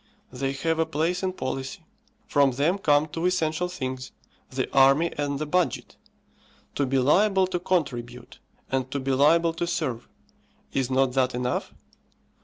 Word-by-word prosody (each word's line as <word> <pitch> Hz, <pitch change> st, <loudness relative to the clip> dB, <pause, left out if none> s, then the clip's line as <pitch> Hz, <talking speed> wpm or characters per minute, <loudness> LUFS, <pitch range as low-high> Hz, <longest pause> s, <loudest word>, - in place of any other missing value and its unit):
They 135 Hz, +1 st, -2 dB
have 160 Hz, +3 st, -1 dB
a 160 Hz, -, +3 dB
place 165 Hz, +3 st, -1 dB
in 190 Hz, -1 st, -1 dB
policy; 135 Hz, +2 st, -5 dB, 0.4 s
from 140 Hz, -2 st, +3 dB
them 155 Hz, +9 st, +1 dB
come 150 Hz, -3 st, +3 dB
two 165 Hz, +3 st, -2 dB
essential 180 Hz, -1 st, 0 dB
things, 130 Hz, -7 st, -5 dB, 0.4 s
the 130 Hz, 0 st, -2 dB
army 135 Hz, +5 st, +5 dB
and 145 Hz, -1 st, -2 dB
the 155 Hz, -, -3 dB
budget. 180 Hz, +4 st, -1 dB, 0.8 s
To 140 Hz, -, 0 dB
be 135 Hz, +1 st, +1 dB
liable 190 Hz, +9 st, +4 dB
to 180 Hz, -1 st, -3 dB
contribute, 125 Hz, -9 st, -3 dB, 0.3 s
and 130 Hz, -1 st, -1 dB
to 140 Hz, -, -3 dB
be 135 Hz, 0 st, -2 dB
liable 165 Hz, +5 st, +4 dB
to 170 Hz, +1 st, -3 dB
serve; 145 Hz, -9 st, -3 dB, 0.6 s
is 130 Hz, -2 st, 0 dB
not 130 Hz, -1 st, +2 dB
that 130 Hz, -1 st, +1 dB
enough? 125 Hz, 0 st, -2 dB
145 Hz, 155 wpm, -25 LUFS, 130-170 Hz, 0.8 s, army